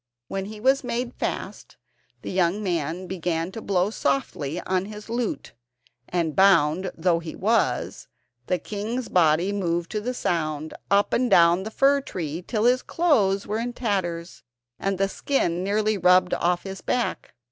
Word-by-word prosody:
When 195 Hz, 0 st, -3 dB
he 210 Hz, +1 st, -8 dB
was 265 Hz, +4 st, +3 dB
made 245 Hz, 0 st, -3 dB
fast, -, -, -5 dB, 0.5 s
the -, -, -5 dB
young 185 Hz, +2 st, +1 dB
man 170 Hz, -1 st, -2 dB
began 175 Hz, -1 st, -2 dB
to 225 Hz, -, -7 dB
blow 195 Hz, 0 st, +1 dB
softly 140 Hz, -1 st, -1 dB
on 185 Hz, 0 st, -1 dB
his 210 Hz, 0 st, -9 dB
flute, 235 Hz, 0 st, -3 dB, 0.6 s
and 165 Hz, -4 st, -1 dB
bound 185 Hz, -2 st, +4 dB
though 170 Hz, 0 st, +2 dB
he 165 Hz, -1 st, -7 dB
was, -, -, 0 dB, 0.4 s
the 180 Hz, -, +1 dB
king's 220 Hz, +6 st, -4 dB
body 170 Hz, +2 st, +3 dB
moved 175 Hz, -4 st, -1 dB
to 210 Hz, -, -2 dB
the 250 Hz, +3 st, -3 dB
sound, 155 Hz, -6 st, -2 dB, 0.2 s
up 200 Hz, +1 st, +3 dB
and 250 Hz, 0 st, +2 dB
down 170 Hz, 0 st, +5 dB
the 210 Hz, -, -5 dB
fir 275 Hz, +4 st, +3 dB
tree 165 Hz, -, -5 dB
till 215 Hz, +3 st, -2 dB
his 250 Hz, +2 st, +4 dB
clothes 210 Hz, -, +2 dB
were 215 Hz, +2 st, -2 dB
in 240 Hz, +1 st, -3 dB
tatters, 185 Hz, -8 st, -3 dB, 0.4 s
and 195 Hz, -1 st, -1 dB
the 195 Hz, +1 st, +2 dB
skin 180 Hz, -6 st, -1 dB
nearly 210 Hz, +1 st, +1 dB
rubbed 180 Hz, 0 st, +4 dB
off 175 Hz, 0 st, +1 dB
his 195 Hz, -1 st, -7 dB
back. 245 Hz, -1 st, -2 dB
190 Hz, 160 wpm, -25 LUFS, 170-215 Hz, 0.6 s, down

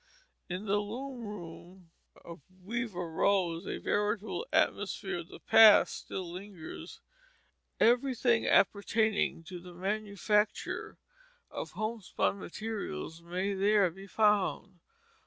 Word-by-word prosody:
In 185 Hz, +4 st, -4 dB
the 205 Hz, 0 st, +2 dB
loom 240 Hz, +4 st, -6 dB
room 175 Hz, -2 st, -10 dB, 0.3 s
of 170 Hz, -2 st, -10 dB
Weaver 190 Hz, -1 st, -4 dB
Rose 175 Hz, 0 st, +1 dB
a -, -, -3 dB
veritable 210 Hz, -, -1 dB
atmosphere -, -, 0 dB
of -, -, -8 dB
the -, -, -12 dB
past 220 Hz, -2 st, +7 dB
still 185 Hz, -2 st, -6 dB
lingers. 180 Hz, -2 st, -9 dB, 0.8 s
Everything 245 Hz, -1 st, +3 dB
appertaining 205 Hz, -2 st, +2 dB
to 180 Hz, +2 st, -8 dB
the 175 Hz, 0 st, -12 dB
manufacture 210 Hz, +2 st, -1 dB, 0.5 s
of -, -, -6 dB
homespun 215 Hz, -2 st, -2 dB
materials 175 Hz, -, -5 dB
may 180 Hz, +4 st, -2 dB
there 200 Hz, -1 st, +3 dB
be 195 Hz, +3 st, -12 dB
found. 210 Hz, -3 st, +1 dB
200 Hz, 105 wpm, -31 LUFS, 180-215 Hz, 0.8 s, past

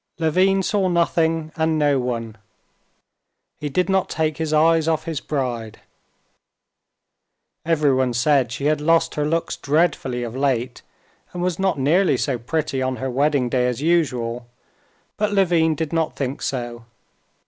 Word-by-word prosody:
Levin 185 Hz, +4 st, +2 dB
saw 200 Hz, -1 st, +1 dB
nothing 165 Hz, -2 st, +1 dB
and 160 Hz, 0 st, +1 dB
no 145 Hz, -2 st, +2 dB
one; 115 Hz, -3 st, -3 dB, 1.2 s
he 150 Hz, -, -3 dB
did 180 Hz, +5 st, 0 dB
not 190 Hz, -1 st, +1 dB
take 155 Hz, -1 st, -1 dB
his 160 Hz, -2 st, -2 dB
eyes 160 Hz, +1 st, +3 dB
off 160 Hz, -1 st, +1 dB
his 165 Hz, -4 st, -3 dB
bride. 120 Hz, -6 st, -4 dB, 1.9 s
Everyone 140 Hz, -6 st, +2 dB
said 125 Hz, 0 st, +2 dB
she 140 Hz, +3 st, -4 dB
had 150 Hz, 0 st, +1 dB
lost 165 Hz, +1 st, +2 dB
her 150 Hz, -, -1 dB
looks 165 Hz, +2 st, -1 dB
dreadfully 140 Hz, -5 st, 0 dB
of 120 Hz, 0 st, -6 dB
late, 130 Hz, -3 st, -1 dB, 0.5 s
and 175 Hz, 0 st, -3 dB
was 180 Hz, -1 st, -1 dB
not 190 Hz, -4 st, +1 dB
nearly 165 Hz, +8 st, +2 dB
so 130 Hz, -4 st, -1 dB
pretty 140 Hz, +2 st, -2 dB
on 130 Hz, 0 st, -1 dB
her 130 Hz, 0 st, -4 dB
wedding 140 Hz, 0 st, +1 dB
day 125 Hz, 0 st, +1 dB
as 125 Hz, -1 st, -2 dB
usual; 125 Hz, -8 st, 0 dB, 0.7 s
but 210 Hz, 0 st, 0 dB
Levin 170 Hz, -5 st, +3 dB
did 160 Hz, 0 st, -4 dB
not 160 Hz, -1 st, 0 dB
think 135 Hz, 0 st, -3 dB
so. 120 Hz, -3 st, -4 dB
150 Hz, 150 wpm, -21 LUFS, 130-165 Hz, 1.9 s, eyes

